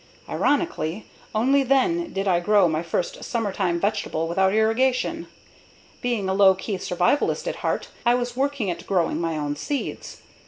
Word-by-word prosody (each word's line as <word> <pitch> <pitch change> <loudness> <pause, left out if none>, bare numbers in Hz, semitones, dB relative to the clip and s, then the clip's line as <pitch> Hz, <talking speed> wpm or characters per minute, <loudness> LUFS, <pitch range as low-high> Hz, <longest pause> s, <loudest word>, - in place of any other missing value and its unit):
Ironically, 215 - -1 0.3
only 265 +6 +3
then 330 +6 +1
did 195 +1 -2
I 175 -2 +3
grow 200 +1 +4
my 160 -1 -1
first 170 +1 -3
summertime 195 -6 -1
vegetable 200 -5 -1
without 190 +3 +2
irrigation. 255 - +1 0.7
Being 235 -6 -1
a 190 - 0
low 190 -1 +6
key 190 0 -4
survivalist 180 +12 +1
at - - -3
heart, - - -2
I 240 +1 +4
was 245 -1 -2
working 270 -7 -1
at 170 - -8
growing 180 -3 +1
my 165 -2 -1
own 145 -1 -2
seeds. 280 - -5
205 Hz, 155 wpm, -24 LUFS, 175-255 Hz, 0.7 s, low